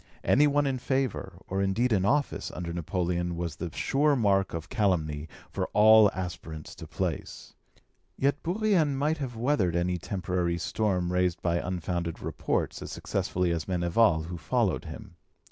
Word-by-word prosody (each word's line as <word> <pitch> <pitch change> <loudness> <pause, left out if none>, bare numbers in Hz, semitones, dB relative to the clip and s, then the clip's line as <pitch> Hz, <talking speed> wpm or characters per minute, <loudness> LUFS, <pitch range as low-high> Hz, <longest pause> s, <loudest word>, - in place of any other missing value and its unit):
Any 150 +2 +5
one 145 0 +2
in 135 -2 -1
favour, 130 -2 -1
or 95 +1 -1
indeed 110 +5 +1
in 95 -2 +2
office, 140 +6 0
under 85 -1 -4
Napoleon 85 +1 -1
was 85 -3 -4
the 85 - -4
sure 145 +2 +2
mark 100 -5 +2
of 80 -1 -5
calumny 80 - 0 0.2
for - - -2
all 110 0 +7
aspirants 90 -4 -6
to - - -9
place; - - -4 0.6
yet 140 +2 +1
Bourrienne 175 -5 +1
might 150 +3 0
have 130 -4 -4
weathered 110 - +1
any 90 +1 0
temporary 90 -1 -1
storm 90 -1 -1
raised 90 -1 +1
by 85 -1 +1
unfounded 85 -1 -3
reports - - -2
as - - -6
successfully 90 -1 -1
as 80 -2 -2
Meneval, 85 -1 +2
who 85 +1 -6
followed - - 0
him. - - -10
95 Hz, 155 wpm, -28 LUFS, 85-125 Hz, 0.6 s, all